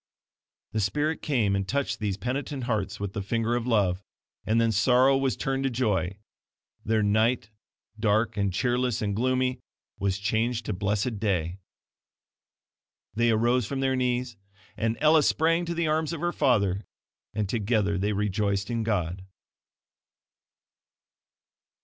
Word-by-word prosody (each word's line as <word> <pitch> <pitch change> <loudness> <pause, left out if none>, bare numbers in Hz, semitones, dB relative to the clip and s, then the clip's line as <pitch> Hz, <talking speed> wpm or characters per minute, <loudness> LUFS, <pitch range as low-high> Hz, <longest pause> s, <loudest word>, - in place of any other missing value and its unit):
The 110 - -1
Spirit 150 +10 0
came 115 -9 +1
and 95 -1 -1
touched 140 +6 -1
these 100 -3 -2
penitent 130 +4 -3
hearts 110 -6 -2
with 100 -1 -4
the 105 - -3
finger 115 +3 0
of 120 0 -2
love; 100 -6 +2 0.5
and 110 +2 +3
then 115 -1 +3
sorrow 125 +5 +4
was 135 -1 0
turned 135 0 -1
to - - +2
joy 105 -6 0 0.7
their 110 0 +1
night, 110 +2 +1 0.5
dark 110 0 +2
and 100 -2 0
cheerless 125 +3 0
and 100 -1 -1
gloomy, 130 +2 +1 0.4
was 100 -1 0
changed 110 +3 -1
to 110 - -2
blessed 105 +4 -1
day. 90 -4 -1 1.5
They 120 +2 +2
arose 120 +1 +2
from 135 - -3
their 135 -1 +1
knees, 125 -2 -1 0.4
and 115 +1 -1
Ella 155 0 +5
sprang 165 +3 +2
to 170 0 -3
the 170 0 0
arms 155 0 0
of 165 - -4
her 175 0 0
father, 100 -8 +2 0.5
and 105 -2 0
together 100 -2 0
they 100 +2 0
rejoiced 100 +1 -1
in 115 -1 -1
God. 95 -5 -1
115 Hz, 145 wpm, -27 LUFS, 100-130 Hz, 1.5 s, Ella